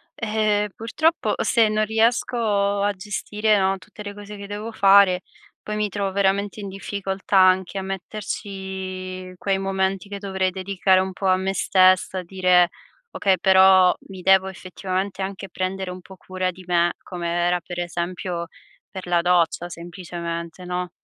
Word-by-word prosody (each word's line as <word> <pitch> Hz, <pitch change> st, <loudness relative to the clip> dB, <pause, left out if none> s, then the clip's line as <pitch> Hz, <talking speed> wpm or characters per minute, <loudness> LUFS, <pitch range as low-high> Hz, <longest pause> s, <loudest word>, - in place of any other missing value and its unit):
eh, 215 Hz, -1 st, 0 dB
purtroppo, 315 Hz, +9 st, 0 dB
se 225 Hz, -3 st, +3 dB
non 215 Hz, 0 st, +1 dB
riesco 220 Hz, -2 st, +1 dB
a 205 Hz, -, +2 dB
gestire, 210 Hz, +1 st, -1 dB
no, 195 Hz, 0 st, +1 dB
tutte 210 Hz, +2 st, -12 dB
le 205 Hz, 0 st, -6 dB
cose 205 Hz, 0 st, -10 dB
che 200 Hz, 0 st, -9 dB
devo 210 Hz, +2 st, -6 dB
fare, 195 Hz, -2 st, +5 dB, 0.4 s
poi 210 Hz, 0 st, -4 dB
mi 210 Hz, 0 st, +1 dB
trovo 200 Hz, 0 st, -2 dB
veramente 200 Hz, +1 st, 0 dB
in 200 Hz, -, -5 dB
difficoltà 195 Hz, 0 st, -2 dB
anche 185 Hz, 0 st, +4 dB
a 190 Hz, -, -2 dB
metterci 190 Hz, -1 st, -6 dB
quei 195 Hz, 0 st, 0 dB
momenti 195 Hz, 0 st, -1 dB
che 200 Hz, -, -5 dB
dovrei 190 Hz, -2 st, -1 dB
dedicare 190 Hz, 0 st, +2 dB
un 190 Hz, 0 st, -2 dB
po' 190 Hz, +1 st, -3 dB
a 185 Hz, 0 st, +4 dB
me 190 Hz, +1 st, -1 dB
stessa, 185 Hz, -1 st, +3 dB
dire: 180 Hz, -1 st, +3 dB, 0.4 s
"Okay, 195 Hz, -1 st, +2 dB
però 190 Hz, -1 st, +6 dB
mi 190 Hz, -1 st, -9 dB
devo 190 Hz, +1 st, +4 dB
effettivamente 190 Hz, +1 st, -4 dB
anche 195 Hz, 0 st, -5 dB
prendere 190 Hz, 0 st, -3 dB
un 180 Hz, 0 st, -7 dB
po' 190 Hz, +1 st, -14 dB
cura 185 Hz, 0 st, -3 dB
di 185 Hz, 0 st, -14 dB
me". 175 Hz, -1 st, +3 dB
Come 175 Hz, -2 st, -5 dB
era, 175 Hz, +1 st, +1 dB
per 175 Hz, +2 st, -7 dB
esempio, 175 Hz, 0 st, -3 dB, 0.4 s
per 190 Hz, -1 st, -8 dB
la 175 Hz, -1 st, +2 dB
doccia, 175 Hz, 0 st, +1 dB
semplicemente, 170 Hz, 0 st, -6 dB
no? 180 Hz, 0 st, -3 dB
190 Hz, 155 wpm, -23 LUFS, 185-200 Hz, 0.4 s, però